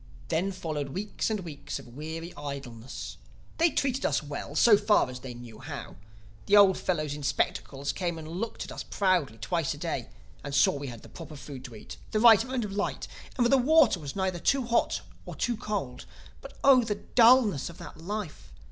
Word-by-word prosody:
"Then 190 +4 +1
followed 155 -6 -4
weeks 200 +11 -3
and 215 -2 -1
weeks 150 -5 -6
of - - -11
weary 160 +3 -6
idleness. 135 -4 -7 0.4
They 335 +1 +5
treated 270 -3 0
us 140 0 +1
well, 145 0 -6
so 220 +5 +7
far 205 - +3
as 125 - -7
they 125 -1 -8
knew 120 -2 -11
how. - - -7 0.5
The 205 - +6
old 195 -2 +7
fellows 155 -5 -1
in 150 - -6
spectacles 140 0 -1
came 175 -3 -2
and 155 -1 -8
looked 185 +8 -4
at - - -9
us - - -5
proudly 180 - +1
twice 140 +8 -1
a - - -12
day 145 -6 -3 0.3
and 140 -1 -4
saw 140 - +5
that 140 - -5
we 140 - -5
had 120 -3 -8
the - - -13
proper 160 -2 -10
food 140 -2 -9
to 120 -3 -9
eat, 105 - -10
the 215 - 0
right 225 -1 +8
amount 255 -2 -2
of 205 - -6
light 200 +1 -2 0.3
and 245 - +3
that 235 - +3
the 275 - +7
water 275 - +5
was 145 -3 -7
not 190 -3 -1
too 275 -3 +2
hot 235 0 +1 0.3
or - - -6
too 240 - 0
cold. 205 - -4 0.3
But - - -11
oh, 265 -3 +7
the 215 -2 -1
dullness 225 - +4
of 170 - -12
that - - -10
life! 200 -1 -6
170 Hz, 210 wpm, -28 LUFS, 140-215 Hz, 0.5 s, right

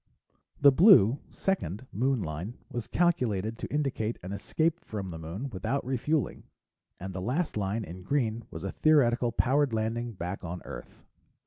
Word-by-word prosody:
The 140 - +8
blue 140 - +7
second 130 - -2
Moon 130 0 +1
line 85 +8 -5 0.2
was 120 -3 -4
calculated 115 - +1
to - - -5
indicate 135 -6 -1
an 90 - -6
escape 160 +11 -1
from, 100 -4 -5
the 80 - -7
Moon 95 - -5
without 110 +8 -2
refueling, 135 +3 -1 0.6
and 95 +1 -6
the 90 - -4
last 140 - -1
line, 105 +2 -1
in 90 -1 -8
green, 115 +1 0
was - - -8
a 95 - -3
theoretical 125 -6 +3
powered 130 +2 +2
landing 115 +2 -1
back 90 +1 -5
on 90 +1 -6
Earth. - - -10
115 Hz, 155 wpm, -29 LUFS, 95-140 Hz, 0.6 s, The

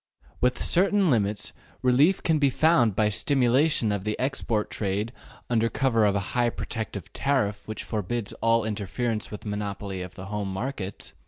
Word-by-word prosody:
Within 125 -1 +1
certain 195 -1 +3
limits 105 -3 0 0.3
relief 140 +9 +4
can 160 -2 +2
be 140 -1 +4
found 130 - +3
by 105 0 +3
stimulation 130 +1 +2
of 100 -2 -2
the 105 +1 -2
export 125 -5 -1
trade 105 +3 -2 0.3
under 115 -1 +2
cover 115 -3 +2
of 100 -1 +2
a 100 -1 -3
high 120 -1 +3
protective 110 -5 -5
tariff 115 -8 0
which 110 - -5
forbids 110 +1 -3
all 115 -1 +3
interference 110 +2 -2
with 105 - -8
monopoly 100 -2 -4
of 90 0 -8
the 95 - -8
home 100 -1 -3
markets. 100 -1 -5
110 Hz, 160 wpm, -26 LUFS, 105-130 Hz, 0.3 s, relief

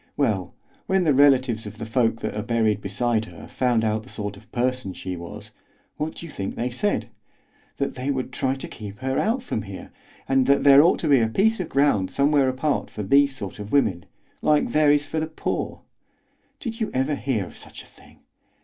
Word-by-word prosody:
Well, 105 -10 0 0.3
when 190 -1 +2
the 155 -4 +3
relatives 130 -5 +4
of 105 +1 -9
the 110 - -5
folk 115 0 +1
that - - -3
are 105 - -2
buried 110 -2 +1
beside 110 +3 0
her - - -12
found 120 -3 +1
out 110 0 0
the 125 - -15
sort 105 -3 -5
of 105 +2 -18
person 125 -5 -1
she 90 0 -5
was, 85 0 -9 0.5
what 155 +1 -3
do - - -8
you 165 - -9
think 95 -6 -4
they 125 +1 -2
said? 205 +12 -1 0.7
That 140 - -1
they 130 +2 -4
would 130 -2 -2
try 130 0 0
to 135 - -7
keep 105 -2 -9
her 130 0 0
out 235 +4 0
from 115 - -3
here, 100 -2 -9 0.4
and 135 -1 +3
that 140 0 +4
there 140 0 +8
ought 170 - +4
to 160 - -1
be 140 -3 +5
a 115 - +2
piece 215 - +2
of 180 - -3
ground 135 -10 +2
somewhere 140 -1 +3
apart 135 +3 -1
for 105 - -6
these 140 +6 +4
sort 125 - -7
of 105 0 -7
women, 95 - +2 0.4
like 150 -1 +2
there 150 -1 +4
is 145 0 +2
for 160 - -3
the 155 - -2
poor. 160 - -4 0.8
Did 230 -2 -5
you 220 - 0
ever 135 +3 +1
hear 130 -8 -1
of - - -13
such - - -11
a - - -18
thing? - - -20
130 Hz, 215 wpm, -24 LUFS, 110-145 Hz, 0.8 s, there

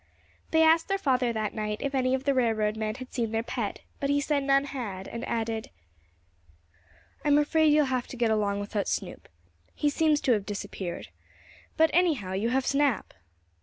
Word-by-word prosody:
They 320 0 +4
asked 320 +1 +4
their 390 - +1
father 255 -8 +1
that 215 -2 -2
night 210 -1 -3
if 280 0 -3
any 260 -1 +2
of 265 - -4
the 280 0 +2
railroad 220 -4 +1
men 215 -1 -2
had 255 0 -10
seen 235 -3 -1
their 225 0 -1
pet, 235 -3 -4 0.2
but 280 - -1
he 285 0 +3
said 285 -1 0
none 275 0 +3
had, 220 -9 -5
and 235 0 -6
added: 225 -1 -2 1.5
"I'm 290 -1 +4
afraid 310 +1 +3
you'll 300 0 +4
have 255 -2 -1
to 255 - -9
get 230 -2 +2
along 205 -2 0
without 205 0 -2
Snoop. - - -4 0.5
He 295 -1 +1
seems 305 0 +2
to 260 - +2
have 210 -4 +2
disappeared. 200 -3 -5 0.7
But, 320 0 +4
anyhow, 315 - +2
you 205 +5 0
have 260 +1 +1
Snap." 280 -5 +1
255 Hz, 185 wpm, -28 LUFS, 215-285 Hz, 1.5 s, They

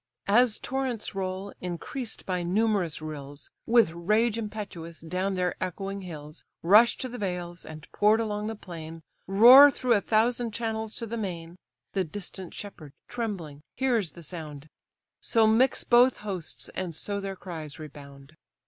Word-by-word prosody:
As 225 +2 +4
torrents 260 -5 -3
roll, 190 +1 -4
increased 185 +7 -4
by 180 -1 -1
numerous 185 -3 0
rills, 145 -2 -8 0.2
With 230 -7 +5
rage 210 +7 +1
impetuous, 205 -7 -6
down 185 +4 -2
their 180 -1 0
echoing 195 +2 -4
hills 155 -4 -9 0.2
Rush 215 +7 +6
to 260 - -4
the 245 0 -8
vales, 180 -3 -4
and 155 0 -10
pour'd 210 +2 +4
along 210 -1 -2
the 220 - -4
plain, 165 -4 -9 0.2
Roar 245 +9 +9
through 255 -3 +1
a 205 - +3
thousand 230 +1 +1
channels 220 -1 -3
to 230 - -4
the 230 +1 -5
main: 175 -5 -5 0.4
The 190 - +1
distant 185 +1 -8
shepherd 160 -8 -9
trembling 185 -12 -5
hears 240 -9 0
the 170 - -12
sound; 155 -3 -8 0.5
So 225 -1 +3
mix 230 +4 +3
both 245 +1 +4
hosts, 175 - -5
and 180 -4 -4
so 200 +5 -3
their 195 -1 -5
cries 160 -6 -7
rebound. 140 -2 -12
195 Hz, 150 wpm, -27 LUFS, 165-225 Hz, 0.5 s, Roar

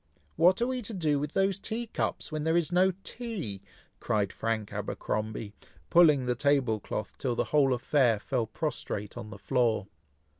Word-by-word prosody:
"What 185 +7 +4
are - - +3
we 255 0 -2
to 220 -1 -5
do 155 -5 +1
with 150 +1 -4
those 195 0 +1
tea 230 +3 -3
cups, 220 - -3
when 155 -1 -2
there 160 +2 +2
is 170 0 +1
no 185 +2 +4
tea?" 200 - -5 0.4
cried 100 -2 0
Frank 110 -2 -2
Abercromby, 105 -1 -3 0.4
pulling 150 -6 +6
the 125 - +1
table 130 -4 +2
cloth 105 +1 -5
till 125 -3 -1
the - - +1
whole 140 -3 +5
affair 125 -2 +3
fell 120 0 -1
prostrate 105 -7 -4
on 120 -3 -7
the 105 - -9
floor. 115 -1 +1
140 Hz, 175 wpm, -29 LUFS, 110-175 Hz, 0.4 s, pulling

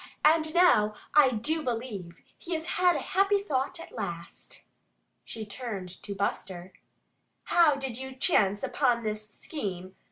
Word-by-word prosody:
And 315 0 +4
now 215 -13 +5 0.2
I 295 -3 +7
do 290 +8 -1
believe 225 - -4 0.2
he 345 - -4
has 320 0 -3
had 355 0 +3
a 290 - -1
happy 395 +2 +4
thought 295 -3 -2
at 335 - -10
last." 170 0 -7 0.6
She 220 -1 -7
turned 200 -4 -6
to 200 0 -6
Buster. 185 -2 -3 0.7
"How 330 -4 +4
did 265 -3 -5
you 265 0 -7
chance 205 - +2
upon 245 -4 +1
this 215 0 -3
scheme?" 190 - -5
245 Hz, 140 wpm, -28 LUFS, 200-315 Hz, 0.7 s, I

